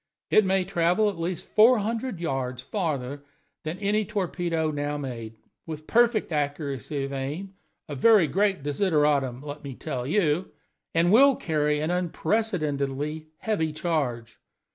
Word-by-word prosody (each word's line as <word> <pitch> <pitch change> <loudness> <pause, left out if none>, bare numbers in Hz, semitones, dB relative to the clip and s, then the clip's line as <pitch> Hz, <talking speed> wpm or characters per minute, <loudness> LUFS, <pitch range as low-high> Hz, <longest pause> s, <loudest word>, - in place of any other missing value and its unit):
It 215 - +6
will 190 -1 +2
travel 180 +3 +2
at 175 - -11
least 170 +1 -3
four 230 +4 +5
hundred 225 0 -2
yards 130 -6 -3
farther 140 -4 -3 0.4
than 160 +3 -4
any 210 +2 +1
torpedo 175 -6 -1
now 145 0 -2
made, 115 -5 -6 0.3
with 155 -1 -6
perfect 235 -2 +2
accuracy 145 -2 -2
of 135 - -6
aim 150 +9 -4 0.3
(a 150 - -6
very 200 - +5
great 195 +1 +1
desideratum, 145 -5 +1
let 145 0 -7
me 140 -2 -7
tell 125 0 -4
you), 165 0 +1 0.5
and 170 +2 +4
will 270 +5 +7
carry 150 -2 0
an 155 +3 -1
unprecedentedly 155 -6 -1
heavy 175 -8 0
charge. 140 -8 -2
160 Hz, 140 wpm, -26 LUFS, 140-195 Hz, 0.5 s, will